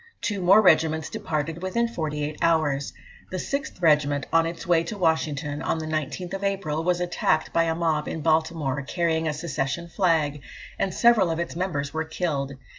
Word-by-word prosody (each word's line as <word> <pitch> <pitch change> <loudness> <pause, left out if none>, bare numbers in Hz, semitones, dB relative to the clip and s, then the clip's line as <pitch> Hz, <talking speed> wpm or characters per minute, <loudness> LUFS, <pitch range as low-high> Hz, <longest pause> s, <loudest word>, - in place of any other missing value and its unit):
Two 205 -3 -2
more 195 +5 +6
regiments 160 -3 +3
departed 155 +2 -3
within 235 +6 0
forty 155 -9 -3
eight 150 +1 -4
hours. 155 -4 +1 0.4
The 185 - -4
6th 275 - -4
Regiment, 145 -3 +3
on 165 0 +4
its 165 0 -6
way 170 -2 +3
to 210 - -5
Washington, 155 -4 0
on - - -1
the 160 - -4
19th 155 +5 -3
April, 190 -6 -1
was 175 0 +1
attacked 175 -3 0
by 165 - +3
a 165 0 0
mob 160 -3 0
in 160 - -4
Baltimore, 160 -3 +1
carrying 160 +2 0
a 155 - 0
secession 150 +1 -3
flag, 160 -5 +1 0.4
and 195 - 0
several 220 -2 +4
of 165 - -1
its 170 -1 -3
members 155 -6 -2
were 160 0 -1
killed." 150 -4 -2
160 Hz, 180 wpm, -25 LUFS, 150-175 Hz, 0.4 s, more